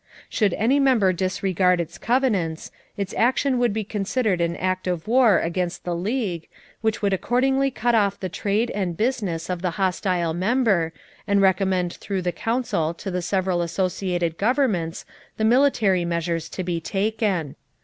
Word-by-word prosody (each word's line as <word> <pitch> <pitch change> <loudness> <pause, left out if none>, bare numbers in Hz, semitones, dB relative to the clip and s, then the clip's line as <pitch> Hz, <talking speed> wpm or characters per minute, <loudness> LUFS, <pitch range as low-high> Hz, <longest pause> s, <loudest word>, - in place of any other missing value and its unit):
Should 205 -5 +1
any 250 +7 +2
member 240 -9 +3
disregard 185 0 +1
its 170 +2 -5
covenants, 210 -11 0 0.3
its 200 -2 -3
action 255 +2 +2
would 240 -2 +2
be 215 +1 -2
considered 205 -1 -1
an 170 0 0
act 185 +1 -2
of 175 -1 -2
war 235 -5 +5
against 175 +1 -2
the 175 -1 -2
League, 185 -3 -2 0.3
which 220 -1 -1
would 200 -1 +2
accordingly 265 +7 +1
cut 240 -1 0
off 200 -3 +2
the 190 - -3
trade 205 +6 -1
and 180 -5 -2
business 205 -8 -1
of 180 -2 -3
the 180 - 0
hostile 180 -3 0
member 190 -3 +1 0.4
and 200 -1 +3
recommend 190 -2 +2
through 195 -3 -4
the 175 - 0
Council 220 -6 -1
to 195 - -6
the 180 0 -2
several 185 0 0
associated 175 -1 -1
governments 210 - 0 0.3
the 220 - +1
military 225 -7 +3
measures 170 -1 -2
to 185 - -5
be 175 -2 -2
taken. 195 -5 -1
190 Hz, 160 wpm, -23 LUFS, 175-225 Hz, 0.4 s, war